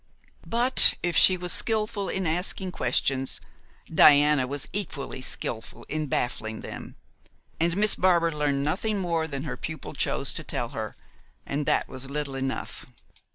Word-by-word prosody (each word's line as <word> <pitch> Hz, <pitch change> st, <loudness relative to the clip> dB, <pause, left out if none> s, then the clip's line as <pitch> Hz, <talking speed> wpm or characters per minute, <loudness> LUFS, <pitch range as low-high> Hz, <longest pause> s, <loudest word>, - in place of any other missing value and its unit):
But 245 Hz, +3 st, +8 dB
if 175 Hz, -2 st, -1 dB
she 185 Hz, +3 st, +5 dB
was 180 Hz, 0 st, -1 dB
skilful 215 Hz, -2 st, 0 dB
in 190 Hz, -1 st, -2 dB
asking 180 Hz, +3 st, -2 dB
questions, 135 Hz, -6 st, 0 dB, 0.5 s
Diana 145 Hz, -3 st, +5 dB
was 140 Hz, +1 st, -5 dB
equally 155 Hz, -9 st, -4 dB
skilful 115 Hz, -3 st, -4 dB
in 155 Hz, 0 st, -3 dB
baffling 110 Hz, -4 st, -3 dB
them, -, -, -9 dB, 0.6 s
and 170 Hz, +2 st, 0 dB
Miss 210 Hz, 0 st, +4 dB
Barbar 170 Hz, -2 st, +2 dB
learned 145 Hz, -2 st, -1 dB
nothing 205 Hz, +8 st, -2 dB
more 170 Hz, -4 st, -2 dB
than 140 Hz, -2 st, -6 dB
her 130 Hz, -5 st, -6 dB
pupil 160 Hz, +4 st, -7 dB
chose -, -, -1 dB
to -, -, -2 dB
tell -, -, -3 dB
her, -, -, -6 dB, 0.5 s
and 145 Hz, +1 st, -4 dB
that -, -, +1 dB
was 130 Hz, +1 st, -8 dB
little 145 Hz, -1 st, -4 dB
enough. 135 Hz, 0 st, -5 dB
155 Hz, 150 wpm, -25 LUFS, 140-185 Hz, 0.6 s, But